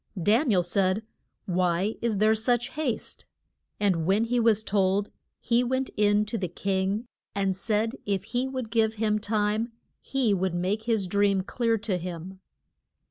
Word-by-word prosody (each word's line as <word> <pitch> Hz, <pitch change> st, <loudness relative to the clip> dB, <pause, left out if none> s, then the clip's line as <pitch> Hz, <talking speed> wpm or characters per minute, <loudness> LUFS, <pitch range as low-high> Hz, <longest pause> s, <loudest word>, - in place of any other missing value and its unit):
Dan 225 Hz, -, +3 dB
i 210 Hz, -, +4 dB
el 180 Hz, -, +3 dB
said, 185 Hz, +3 st, +1 dB, 0.4 s
Why 180 Hz, +2 st, +1 dB
is 230 Hz, -3 st, 0 dB
there 215 Hz, +2 st, +4 dB
such 235 Hz, +2 st, 0 dB
haste? 290 Hz, -7 st, -4 dB, 0.5 s
And 180 Hz, -6 st, +1 dB
when 200 Hz, +4 st, +3 dB
he 240 Hz, +1 st, +1 dB
was 220 Hz, -2 st, +3 dB
told 200 Hz, -1 st, +1 dB, 0.3 s
he 240 Hz, 0 st, +2 dB
went 260 Hz, +1 st, -1 dB
in 210 Hz, 0 st, +3 dB
to 215 Hz, +2 st, -3 dB
the 185 Hz, -, -1 dB
king 195 Hz, +5 st, -1 dB, 0.3 s
and 195 Hz, -1 st, +1 dB
said 220 Hz, +4 st, 0 dB
if 200 Hz, -2 st, 0 dB
he 250 Hz, +1 st, -2 dB
would 255 Hz, -4 st, -5 dB
give 225 Hz, -1 st, +2 dB
him 215 Hz, -1 st, +1 dB
time 215 Hz, +2 st, 0 dB, 0.3 s
he 260 Hz, -6 st, +1 dB
would 190 Hz, -2 st, 0 dB
make 195 Hz, +5 st, -1 dB
his 225 Hz, -4 st, +1 dB
dream 200 Hz, +1 st, +2 dB
clear 230 Hz, +2 st, 0 dB
to 205 Hz, -4 st, -2 dB
him. 180 Hz, +2 st, -7 dB
210 Hz, 165 wpm, -27 LUFS, 190-230 Hz, 0.5 s, i